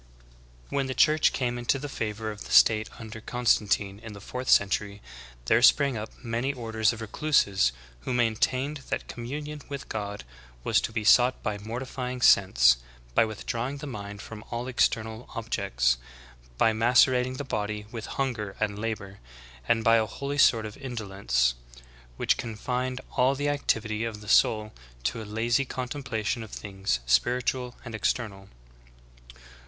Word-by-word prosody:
"^' - - -27 0.7
24. - - -5
When 135 - 0
the 130 - -3
Church 155 -1 +4
came 120 -2 -2
into 120 +3 +1
the 140 +2 -5
favor 110 -4 -4
of 105 0 -9
the - - -9
state 110 -1 +5
un 110 -1 -9
der 110 - -7
Constantine 105 -5 +1
in 110 -1 -9
the 100 - -10
fourth 125 +5 -5
century, 100 0 +3 0.5
there 110 - +4
sprang 140 +1 +5
up 110 0 -5
many 120 +3 -1
orders 110 -3 0
of 115 -1 -7
recluses 105 - +2 0.3
who - - -5
''maintained 130 +4 0
that - - -2
communion 145 +5 -6
with 140 -1 -6
God 100 -5 -4 0.4
was - - +3
to - - -3
be 110 -1 -2
sought 125 +3 +5
by 105 -1 -2
mortifying 125 +3 -5
sense, 60 - +6 0.4
by 115 - +5
withdrawing 115 +5 -4
the 140 - -7
mind 105 -6 -7
from 110 -1 -9
all 120 +1 -4
external 110 -2 0
objects, - - 0 0.6
by 110 - +4
macerating 125 +2 +4
the 145 - -3
body 105 -4 -3
with 115 -2 -6
hunger 110 -7 -2
and 105 -1 -1
labor, 105 -3 -4 0.5
and 115 -1 +2
by 115 +1 +6
a 110 -1 +1
holy 140 +4 -4
sort 115 -5 +5
of 105 - -8
indolence, 100 - 0 0.6
which - - +2
confined 125 +3 -3
all 130 +2 +2
the 145 +1 -1
activity 115 -6 0
of 110 -2 -4
the 105 - -12
soul 110 0 +3 0.3
to - - -1
a - - -7
lazy 115 +5 +1
contem 130 +2 -5
plation 115 -2 -2
of 110 - -8
things 95 - -3
spiritual 125 - +1
and 120 - -7
external." 105 -3 -2
115 Hz, 160 wpm, -27 LUFS, 105-125 Hz, 0.7 s, sense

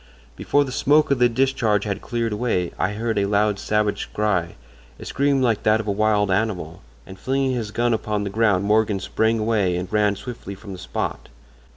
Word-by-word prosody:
Before 145 - +1
the 135 - -6
smoke 150 +3 +3
of 140 - +2
the 120 0 +5
discharge 115 -4 +1
had 100 -1 -3
cleared 115 -2 -2
away 105 -6 -1
I 95 +5 0
heard 110 0 -1
a 100 - +1
loud 105 0 +1
savage 105 -1 -1
cry—a 85 - -4
scream 140 -1 +1
like 115 -4 +1
that 110 +1 +3
of 110 - -5
a - - +1
wild 105 -1 +1
animal—and 95 - -4
flinging 135 +1 0
his 120 -4 -3
gun 120 +3 0
upon 105 -2 -2
the 100 - -4
ground 105 -3 +2
Morgan 105 -1 +2
sprang 110 +4 0
away 105 -5 +1
and 90 +3 -5
ran 105 -1 +2
swiftly 110 -3 -8
from 100 +1 -11
the 90 - -9
spot. - - -4
105 Hz, 190 wpm, -22 LUFS, 100-115 Hz, -, the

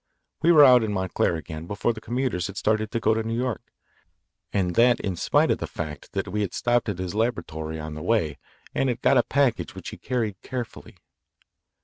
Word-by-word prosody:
We 170 - +5
were 155 -3 +8
out 125 -2 +7
in 110 - -1
Montclair 95 -2 0
again 80 0 -7
before 105 +4 0
the 110 - -9
commuters 120 -7 -1
had 100 -1 -9
started 110 0 +1
to 115 - -2
go 110 - +3
to 110 - 0
New 115 +1 -3
York, 125 -3 -3 0.8
and 90 -3 0
that 120 +6 +4
in 95 -2 -2
spite - - +2
of - - 0
the - - -3
fact 75 -3 -7
that - - -2
we 105 +3 -2
had 100 -4 -2
stopped 120 -1 +1
at 100 - -3
his 90 0 -4
laboratory 80 -9 -2
on 75 0 -6
the 75 - -7
way 80 - 0 0.3
and 135 - +1
had 120 0 -3
got 135 - +5
a - - +7
package 135 -1 0
which - - -7
he - - -9
carried 115 -6 -2
carefully. 125 -3 -7
110 Hz, 215 wpm, -25 LUFS, 90-120 Hz, 0.8 s, were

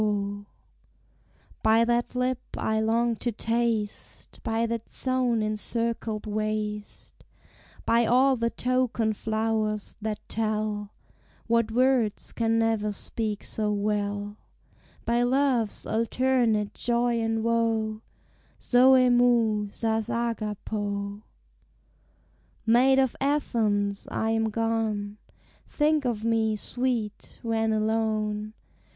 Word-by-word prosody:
] - - -33
By 225 +1 +4
that 240 +1 0
lip 250 0 0 0.2
I 220 0 0
long 230 +2 +1
to 240 - -2
taste; 225 -1 -2
By 225 0 0
that 230 -1 -4
zone 255 -4 0
encircled 220 0 -2
waist; 215 0 -4 0.6
By 230 0 +3
all 260 +2 +4
the 230 -1 0
token 245 -3 0
flowers 220 -1 -1
that 215 0 -2
tell 215 -1 -2 0.5
What 230 -1 +2
words 245 -2 +1
can 225 -1 +1
never 225 -2 +1
speak 210 0 -4
so 210 -1 -2
well; 205 0 -2 0.7
By 235 +1 +2
love's 250 -3 +1
alternate 230 -2 +1
joy 240 0 0
and 225 0 0
woe, 225 -2 0 0.6
[Greek: - - -41
Zôê 255 0 +5
moy 230 -4 +3
sas 220 +1 -1
hagapô.] 210 -3 -3 1.4
Maid 250 +4 +5
of 265 -2 +2
Athens! 215 -8 0
I 220 0 -1
am 225 0 +1
gone. 215 -2 -1 0.5
Think 300 -1 +1
of 225 -3 -1
me, 225 -1 +2
sweet! 235 -1 -3
when 225 -1 0
alone. 215 -1 -1
225 Hz, 105 wpm, -27 LUFS, 215-235 Hz, 1.4 s, Zôê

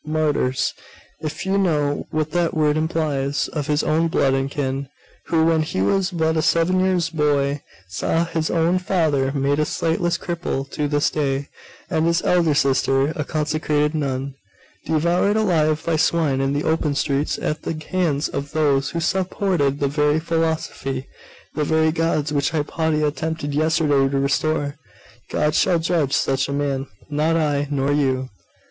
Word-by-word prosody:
martyrs 150 -4 0 0.5
if 155 +4 -5
you 195 +1 +1
know 150 -6 0
what 155 -1 -2
that 170 0 0
word 150 -1 +2
implies 150 -4 -1
of 150 -2 -4
his 150 -1 +1
own 160 +2 +2
blood 140 -4 +2
and 135 0 0
kin; 135 -1 -3 0.4
who, 160 -1 +2
when 165 -1 +3
he 155 -11 -3
was 185 - +2
but 160 -3 0
a 160 - +2
seven 170 +4 +2
years' 180 -3 +1
boy, 145 -2 +1 0.3
saw 165 - 0
his 160 -1 -2
own 170 +2 +2
father 160 -8 +1
made 140 +1 +1
a - - +3
sightless 165 +2 0
cripple 170 -6 -3
to 150 -1 -1
this 145 +1 +1
day, 140 -2 -1 0.4
and 160 +1 +1
his 170 0 +1
elder 170 -4 +3
sister, 135 0 +2
a 150 - -2
consecrated 150 0 0
nun, 140 -3 -2 0.5
devoured 170 +6 +2
alive 155 -7 +2
by 170 - +1
swine 155 -4 +1
in 135 0 0
the 145 +2 -1
open 160 -2 0
streets, 140 0 0
at 155 0 -3
the 165 - -4
hands 165 -6 +1
of 140 0 -5
those 140 -3 +2
who 170 - -3
supported 180 -5 0
the 140 - +1
very 150 +2 +2
philosophy, 160 -5 -2 0.5
the 150 - -1
very 160 +1 +2
gods, 155 -2 0
which 140 -1 +1
Hypatia 155 0 0
attempted 150 -1 -3
yesterday 150 -3 +2
to 140 - -1
restore. 145 +1 0 0.5
God 150 0 +1
shall 180 +2 +3
judge 160 -4 0
such 135 0 +1
a - - -2
man; 140 -1 -1 0.2
not 155 +2 +1
I, 145 -3 +1
nor 140 -1 0
you! 130 -3 0
150 Hz, 165 wpm, -21 LUFS, 140-165 Hz, 0.5 s, when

